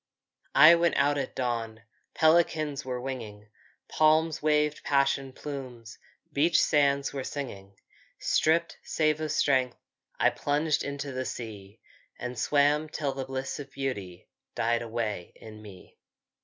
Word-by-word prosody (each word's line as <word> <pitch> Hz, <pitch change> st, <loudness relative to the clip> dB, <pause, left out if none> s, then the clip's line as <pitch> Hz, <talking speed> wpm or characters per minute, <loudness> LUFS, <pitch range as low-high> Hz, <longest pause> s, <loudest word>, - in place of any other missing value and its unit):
I 155 Hz, +2 st, +9 dB
went 170 Hz, 0 st, +2 dB
out 145 Hz, 0 st, +2 dB
at -, -, -5 dB
dawn, 115 Hz, -3 st, -3 dB, 0.3 s
Pelicans 155 Hz, -3 st, +2 dB
were 125 Hz, -1 st, -4 dB
winging. 115 Hz, -5 st, -7 dB, 0.4 s
Palms 155 Hz, 0 st, +2 dB
waved 150 Hz, 0 st, +1 dB
passion 135 Hz, -1 st, +1 dB
plumes, 130 Hz, -5 st, -8 dB, 0.3 s
Beach 160 Hz, +4 st, +3 dB
sands 140 Hz, -2 st, +2 dB
were 135 Hz, -2 st, -4 dB
singing. 100 Hz, -9 st, -7 dB, 0.4 s
Stripped, 165 Hz, +2 st, +1 dB
save 155 Hz, -1 st, 0 dB
of 155 Hz, -1 st, -2 dB
strength, 130 Hz, -5 st, +1 dB, 0.4 s
I -, -, +4 dB
plunged 150 Hz, +1 st, 0 dB
into 140 Hz, 0 st, -5 dB
the 130 Hz, 0 st, -3 dB
sea 105 Hz, -4 st, -8 dB, 0.4 s
And 125 Hz, -1 st, -6 dB
swam, 145 Hz, +4 st, +2 dB
till 145 Hz, -3 st, -2 dB
the 135 Hz, 0 st, -5 dB
bliss 135 Hz, +1 st, -4 dB
of 140 Hz, -1 st, -8 dB
beauty 105 Hz, -11 st, -5 dB, 0.3 s
Died 115 Hz, +1 st, +1 dB
away 110 Hz, -6 st, -4 dB
in 110 Hz, -1 st, -12 dB
me. 100 Hz, -4 st, -14 dB
135 Hz, 130 wpm, -28 LUFS, 120-150 Hz, 0.4 s, I